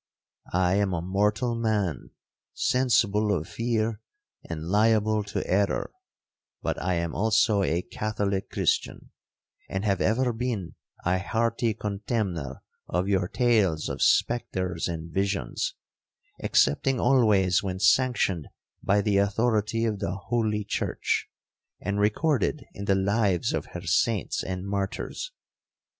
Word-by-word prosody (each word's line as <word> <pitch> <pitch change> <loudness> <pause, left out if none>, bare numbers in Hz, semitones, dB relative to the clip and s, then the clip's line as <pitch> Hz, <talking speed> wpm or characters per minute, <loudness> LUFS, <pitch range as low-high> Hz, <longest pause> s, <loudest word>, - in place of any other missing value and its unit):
I 90 +1 +3
am 100 -3 +1
a 85 - -2
mortal 105 +6 +1
man, 105 - -1 0.5
sensible 110 -5 +2
of 80 -4 -1
fear, 115 -1 -1 0.5
and 80 -2 -4
liable 110 +1 +3
to 100 - -3
error,—but 100 +1 -3
I 90 +2 0
am 85 -1 -2
also 110 -1 +3
a 85 -1 0
Catholic 100 -2 -2
Christian, - - -1 0.6
and 95 +2 -2
have 100 -3 +1
ever 120 +2 +2
been 115 -6 -3 0.3
a 90 +1 +2
hearty 115 +2 0
contemner 100 - -3 0.2
of 90 +2 -1
your 95 -3 +1
tales 105 -10 +2
of - - -5
spectres 95 -7 +1
and 85 -1 -5
visions, 100 - -1 0.7
excepting 135 -2 +2
always 105 -8 +4
when 95 -2 -3
sanctioned 100 - +2 0.3
by 100 +1 +2
the 100 -1 +1
authority 110 +2 +1
of 105 -3 -1
the 90 +1 -2
holy 105 +1 -1
church, - - -1 0.5
and 100 0 -2
recorded 130 - +1
in 100 - -6
the 100 - +3
lives 100 -2 +1
of - - -2
her - - -5
saints - - +1
and 95 0 -4
martyrs. 100 - -3
100 Hz, 120 wpm, -26 LUFS, 95-115 Hz, 0.7 s, always